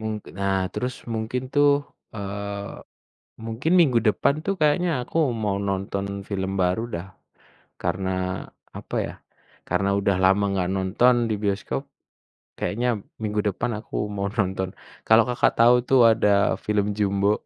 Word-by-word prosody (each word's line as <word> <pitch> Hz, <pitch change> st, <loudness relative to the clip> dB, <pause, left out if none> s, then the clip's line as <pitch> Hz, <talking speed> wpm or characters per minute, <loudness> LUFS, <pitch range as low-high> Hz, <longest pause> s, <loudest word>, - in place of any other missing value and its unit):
Mung 110 Hz, 0 st, -3 dB, 0.3 s
nah, 95 Hz, -1 st, +1 dB
terus 125 Hz, 0 st, -3 dB, 0.2 s
mungkin 110 Hz, +3 st, -2 dB
tuh, 145 Hz, 0 st, +6 dB, 0.4 s
eee, 100 Hz, 0 st, -5 dB, 0.7 s
mungkin 115 Hz, +8 st, -2 dB
minggu 130 Hz, -8 st, +4 dB
depan 125 Hz, +6 st, +2 dB
tuh 195 Hz, -, 0 dB
kayaknya 170 Hz, +4 st, +3 dB
aku 140 Hz, -, -5 dB, 0.3 s
mau 100 Hz, -2 st, 0 dB
nonton 100 Hz, 0 st, -2 dB, 0.2 s
film 95 Hz, -2 st, -2 dB
baru 90 Hz, +5 st, +1 dB
dah, 85 Hz, +3 st, -6 dB, 0.8 s
karena 95 Hz, -1 st, -1 dB, 0.6 s
apa -, -, -7 dB
ya, -, -, -8 dB, 0.6 s
karena 100 Hz, -, +1 dB
udah 100 Hz, -1 st, +1 dB
lama 95 Hz, +2 st, +4 dB
enggak 90 Hz, -2 st, 0 dB
nonton 95 Hz, +7 st, +3 dB, 0.2 s
di 110 Hz, -, +1 dB
bioskop. 100 Hz, +6 st, -1 dB, 0.8 s
Kayaknya, 120 Hz, +4 st, -1 dB, 0.3 s
minggu 105 Hz, 0 st, -1 dB
depan 100 Hz, -, -2 dB
aku 105 Hz, -1 st, -4 dB
mau 100 Hz, 0 st, -1 dB
nonton. 95 Hz, -2 st, -1 dB, 0.3 s
Kalau 110 Hz, +1 st, +6 dB
Kakak, 125 Hz, -, +2 dB
tahu 120 Hz, +1 st, +7 dB
tuh 135 Hz, 0 st, +4 dB
ada 100 Hz, -2 st, +2 dB
film 105 Hz, -1 st, 0 dB
Jumbo. 100 Hz, 0 st, +1 dB
105 Hz, 140 wpm, -24 LUFS, 100-115 Hz, 0.8 s, tahu